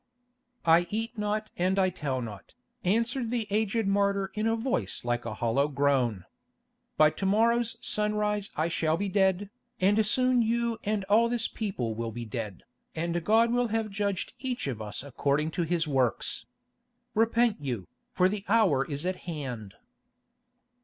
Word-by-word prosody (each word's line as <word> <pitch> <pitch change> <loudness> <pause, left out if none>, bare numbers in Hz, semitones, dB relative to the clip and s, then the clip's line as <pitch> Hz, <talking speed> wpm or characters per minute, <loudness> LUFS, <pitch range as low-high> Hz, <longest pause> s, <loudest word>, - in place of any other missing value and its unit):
"I 170 +1 +5
eat 225 +2 -3
not 210 0 -2
and 185 +2 +1
I 185 -1 +3
tell 140 -7 -3
not," 105 - -9 0.3
answered 230 +5 +1
the 235 -2 -1
aged 220 +1 +1
martyr 200 -1 +1
in 215 +1 0
a 225 - +2
voice 250 - -2
like 120 0 -1
a 110 - -4
hollow 120 +5 +1
groan. 135 -8 +1 0.7
"By 155 0 +6
to 190 +5 -2
morrow's 230 +3 +2
sunrise 210 -1 0
I 155 +2 +1
shall 160 -1 +1
be 200 +2 -2
dead, 190 0 +1 0.3
and 205 +4 +4
soon 255 +3 +3
you 235 0 0
and 210 -1 0
all 215 +4 +4
this 240 -1 0
people 160 - -3
will 115 +1 -3
be 120 +1 -6
dead, 110 -4 -5 0.3
and 170 +1 -1
God 225 +5 +4
will 245 0 +2
have 220 -1 -1
judged 200 -2 -2
each 255 -2 -3
of 125 -6 -3
us 105 +4 -4
according 140 +3 0
to 175 - -2
his 165 0 0
works. 130 -6 0 0.7
Repent 230 0 +3
you, 120 -10 -3 0.2
for 185 - +3
the 200 +1 -3
hour 195 -11 +4
is 145 +3 -5
at 185 0 -1
hand." 125 - -5
195 Hz, 160 wpm, -28 LUFS, 140-220 Hz, 0.7 s, By